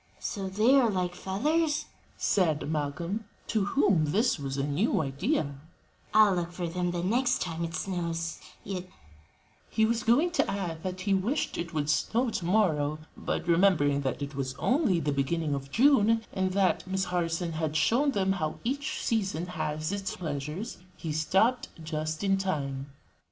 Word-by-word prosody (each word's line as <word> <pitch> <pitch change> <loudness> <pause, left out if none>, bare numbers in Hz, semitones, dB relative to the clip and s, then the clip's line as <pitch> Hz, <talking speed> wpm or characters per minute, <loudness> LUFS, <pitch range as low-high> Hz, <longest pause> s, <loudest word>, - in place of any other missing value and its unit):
"So 195 -3 -4
they 215 +7 +3
are 240 -4 +3
like 180 -3 -1
feathers?" 295 - 0 0.3
said 160 -7 +1
Malcolm, 160 +8 -2 0.2
to 215 -3 0
whom 200 - +3
this 200 - +1
was 135 -1 -4
a 135 - 0
new 145 +10 +1
idea, 145 - -1 0.5
"I'll 215 -2 +6
look 175 -1 -2
for 175 0 -6
'em 175 +1 -1
the 175 0 -2
next 245 +6 +2
time 165 -1 -3
it 165 0 -4
snows; 170 -3 -3 0.2
yet 185 -2 -4 0.5
" - - -36 0.3
He 220 - +2
was 230 +1 +1
going 280 +11 +3
to 345 - +1
add 175 -5 -3
that 185 +1 -4
he 200 +1 +1
wished 210 +10 0
it 170 0 -4
would 145 -1 0
snow 225 +11 +1
to 175 - -3
morrow; 155 -7 +2 0.2
but - - -3
remembering 165 -5 +4
that 135 +1 -2
it 140 +1 -6
was 135 -1 -3
only 250 - +2
the 150 -2 0
beginning 145 +2 0
of 140 -1 -4
June, 225 - +4
and 190 0 0
that 190 -2 +2
Miss 190 0 0
Harson 175 -1 -1
had 155 -1 -2
shown 240 - +3
them 195 -7 +1
how 155 -5 -2
each 280 +4 -2
season 195 -7 0
has 155 -2 -3
its 200 -1 -3
pleasures, 155 - -4 0.2
he 160 - -4
stopped 195 +11 +2 0.2
just 155 +1 -3
in 195 -1 +2
time. 140 -8 -2
180 Hz, 170 wpm, -29 LUFS, 155-210 Hz, 0.5 s, I'll